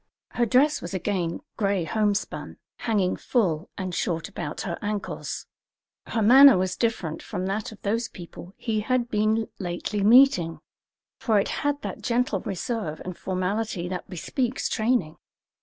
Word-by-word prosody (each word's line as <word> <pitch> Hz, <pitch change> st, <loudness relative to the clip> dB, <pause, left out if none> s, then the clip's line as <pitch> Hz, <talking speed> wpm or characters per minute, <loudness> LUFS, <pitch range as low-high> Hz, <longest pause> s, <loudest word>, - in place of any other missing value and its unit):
Her 240 Hz, -1 st, 0 dB
dress 280 Hz, +6 st, +3 dB
was 175 Hz, +2 st, -5 dB
again 180 Hz, -2 st, -1 dB, 0.2 s
gray 200 Hz, -4 st, +1 dB
homespun, 205 Hz, +2 st, -1 dB, 0.2 s
hanging 200 Hz, -5 st, 0 dB
full 185 Hz, -, 0 dB
and 185 Hz, -2 st, -4 dB
short 165 Hz, -1 st, -1 dB
about 150 Hz, -, -5 dB
her 170 Hz, -3 st, -4 dB
ankles. 205 Hz, -1 st, -4 dB, 0.6 s
Her 225 Hz, -, 0 dB
manner 265 Hz, +2 st, +9 dB
was 185 Hz, 0 st, 0 dB
different 210 Hz, -9 st, -1 dB
from 185 Hz, -4 st, -4 dB
that 200 Hz, +3 st, -2 dB
of 215 Hz, -, -12 dB
those 225 Hz, +3 st, 0 dB
people 175 Hz, +1 st, -11 dB
he 220 Hz, -3 st, -1 dB
had 240 Hz, +2 st, 0 dB
been 215 Hz, +1 st, +1 dB
lately 185 Hz, +3 st, -3 dB
meeting, 210 Hz, -8 st, +5 dB, 0.6 s
for 220 Hz, -4 st, +3 dB
it -, -, 0 dB
had 290 Hz, 0 st, 0 dB
that -, -, -5 dB
gentle 240 Hz, -4 st, +1 dB
reserve 190 Hz, -4 st, -3 dB
and 180 Hz, -1 st, -5 dB
formality 185 Hz, +1 st, -2 dB
that 180 Hz, -1 st, -5 dB
bespeaks 245 Hz, -, -2 dB
training. 220 Hz, -9 st, 0 dB
205 Hz, 145 wpm, -26 LUFS, 180-230 Hz, 0.6 s, manner